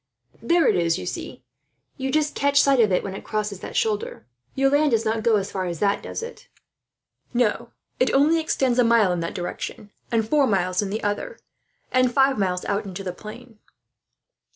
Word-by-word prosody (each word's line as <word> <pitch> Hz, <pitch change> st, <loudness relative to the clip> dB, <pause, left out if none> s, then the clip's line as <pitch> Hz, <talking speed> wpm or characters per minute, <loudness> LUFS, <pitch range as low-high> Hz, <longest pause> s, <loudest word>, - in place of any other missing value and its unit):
"There 335 Hz, +8 st, +3 dB
it -, -, +3 dB
is, 165 Hz, -1 st, +1 dB
you -, -, -6 dB
see. -, -, -6 dB, 0.5 s
You 265 Hz, -1 st, -3 dB
just 300 Hz, +1 st, +1 dB
catch 280 Hz, 0 st, +2 dB
sight 275 Hz, -2 st, +4 dB
of 215 Hz, -4 st, +4 dB
it, 180 Hz, -, +1 dB
as 195 Hz, -, -4 dB
it 195 Hz, -, -8 dB
crosses 210 Hz, -3 st, -3 dB
that -, -, -8 dB
shoulder. 210 Hz, -, -1 dB, 0.3 s
Your 270 Hz, 0 st, +2 dB
land 295 Hz, +1 st, +3 dB
does 225 Hz, -3 st, +1 dB
not 220 Hz, 0 st, 0 dB
go 225 Hz, 0 st, +3 dB
as 200 Hz, -1 st, -1 dB
far 185 Hz, -1 st, -2 dB
as 170 Hz, -2 st, -4 dB
that, 200 Hz, +4 st, +1 dB
does -, -, -6 dB
it?" 470 Hz, -, -10 dB, 0.9 s
"No, 235 Hz, 0 st, +1 dB, 0.3 s
it 255 Hz, -, +2 dB
only 300 Hz, +4 st, +4 dB
extends 265 Hz, -6 st, 0 dB
a -, -, +6 dB
mile 230 Hz, -5 st, +4 dB
in 175 Hz, -, -1 dB
that 170 Hz, 0 st, -4 dB
direction, 190 Hz, +3 st, -6 dB, 0.2 s
and 225 Hz, -2 st, +1 dB
four 290 Hz, +1 st, +3 dB
miles 185 Hz, -3 st, +1 dB
in 205 Hz, -, -3 dB
the 215 Hz, +3 st, -4 dB
other, 335 Hz, -, -3 dB, 0.5 s
and 255 Hz, -1 st, +3 dB
five 270 Hz, -2 st, +3 dB
miles 180 Hz, -2 st, -1 dB
out 200 Hz, +2 st, -1 dB
into 195 Hz, 0 st, -7 dB
the 180 Hz, -2 st, -4 dB
plain." 220 Hz, +3 st, -12 dB
220 Hz, 200 wpm, -23 LUFS, 195-270 Hz, 0.9 s, a